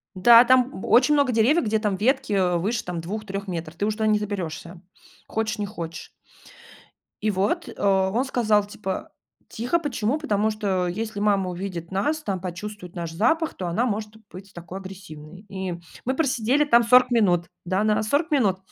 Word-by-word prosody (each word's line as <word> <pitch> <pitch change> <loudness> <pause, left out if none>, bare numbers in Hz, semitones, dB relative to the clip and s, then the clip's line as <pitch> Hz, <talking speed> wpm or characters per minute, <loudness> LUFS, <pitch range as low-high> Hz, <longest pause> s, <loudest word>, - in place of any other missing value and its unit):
Да, 230 +5 +8
там 255 -3 +3
б - - -6
очень 255 +5 +5
много 280 -3 +3
деревьев, 245 +9 +3
где 220 0 +1
там 210 -3 -1
ветки, 260 +2 +1
э, 180 -3 +2
выше 210 +6 -1
там 175 -1 -4
2-3 200 +2 -5
метров. 165 -3 -5
Ты 200 - -1
уже 215 0 -1
туда 220 -1 0
не 215 -1 +4
заберешься, 180 -4 -5 0.5
хочешь, 220 -1 -2
не 205 - -2
хочешь. 170 -5 -7 1.1
И 215 - +1
вот, 195 +1 -1
э, - - -9
он 195 +4 +2
сказал, 220 -6 +2
типа: 200 -2 -5 0.4
"Тихо, 245 +9 -1
почему? 280 -4 -1
Потому 215 -8 0
что 195 -4 -1
если 210 +4 -4
мама 200 -3 +1
увидит 175 -2 -6
нас, 205 +12 0
там 195 -8 -3
почувствует 180 +1 -7
наш 170 -2 -5
запах, 280 - +1
то 185 - -5
она 200 +9 0
может 215 -1 -4
быть 190 +2 -12
такой 175 +2 -8
агрессивной". 185 -2 -11
И 190 -2 -4 0.3
мы 260 - 0
просидели 265 -1 +2
там 235 -5 +5
40 250 +2 +5
минут. 185 -8 +2 0.2
Да, 185 +4 0
на 215 0 +2
40 285 +10 0
минут. 215 -11 +2
210 Hz, 180 wpm, -24 LUFS, 185-235 Hz, 1.1 s, Да